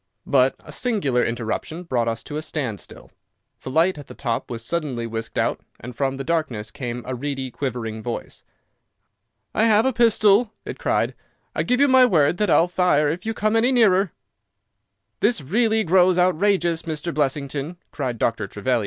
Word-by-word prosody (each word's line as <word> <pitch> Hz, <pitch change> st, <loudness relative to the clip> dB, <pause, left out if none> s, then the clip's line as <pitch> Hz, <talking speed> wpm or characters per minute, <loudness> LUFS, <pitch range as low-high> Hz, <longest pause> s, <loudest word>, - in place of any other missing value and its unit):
But 135 Hz, -1 st, +3 dB
a -, -, -11 dB
singular 190 Hz, -, 0 dB
interruption 120 Hz, +8 st, -3 dB
brought 125 Hz, -8 st, -1 dB
us 115 Hz, 0 st, -2 dB
to 150 Hz, -, -7 dB
a 155 Hz, -, -2 dB
standstill. 130 Hz, -10 st, -6 dB, 0.5 s
The -, -, -7 dB
light 165 Hz, +4 st, +2 dB
at 145 Hz, -, -11 dB
the -, -, -11 dB
top 120 Hz, -4 st, -3 dB
was 115 Hz, -1 st, -5 dB
suddenly 145 Hz, -8 st, -2 dB
whisked 115 Hz, 0 st, -5 dB
out, -, -, 0 dB, 0.2 s
and 125 Hz, +1 st, -9 dB
from 135 Hz, +1 st, -1 dB
the 135 Hz, -, -4 dB
darkness 150 Hz, -9 st, -2 dB
came 120 Hz, -2 st, -5 dB
a 130 Hz, -, -4 dB
reedy, 135 Hz, 0 st, -4 dB
quivering 115 Hz, -5 st, -4 dB
voice. 120 Hz, +1 st, -6 dB, 1.1 s
"I 220 Hz, -, +3 dB
have 220 Hz, 0 st, +4 dB
a 265 Hz, -, +2 dB
pistol," 220 Hz, -1 st, +4 dB
it -, -, -7 dB
cried. -, -, 0 dB, 0.4 s
"I -, -, 0 dB
give 250 Hz, +1 st, +1 dB
you 285 Hz, -, +5 dB
my 260 Hz, -1 st, +6 dB
word 160 Hz, -5 st, +3 dB
that 210 Hz, 0 st, +1 dB
I'll 170 Hz, -, +5 dB
fire 175 Hz, -5 st, +2 dB
if 175 Hz, +7 st, -4 dB
you 225 Hz, -, -2 dB
come 215 Hz, +2 st, +1 dB
any 235 Hz, +3 st, +3 dB
nearer." 200 Hz, -7 st, +4 dB, 1.1 s
"This 240 Hz, -, +2 dB
really 220 Hz, -, +1 dB
grows 180 Hz, 0 st, +4 dB
outrageous, 180 Hz, -1 st, +2 dB
Mr. 160 Hz, +1 st, -4 dB
Blessington," 145 Hz, +2 st, -2 dB
cried 130 Hz, -5 st, -3 dB
Dr. 110 Hz, -2 st, -1 dB
Trevelyan. 120 Hz, +6 st, -1 dB
155 Hz, 175 wpm, -22 LUFS, 125-195 Hz, 1.1 s, my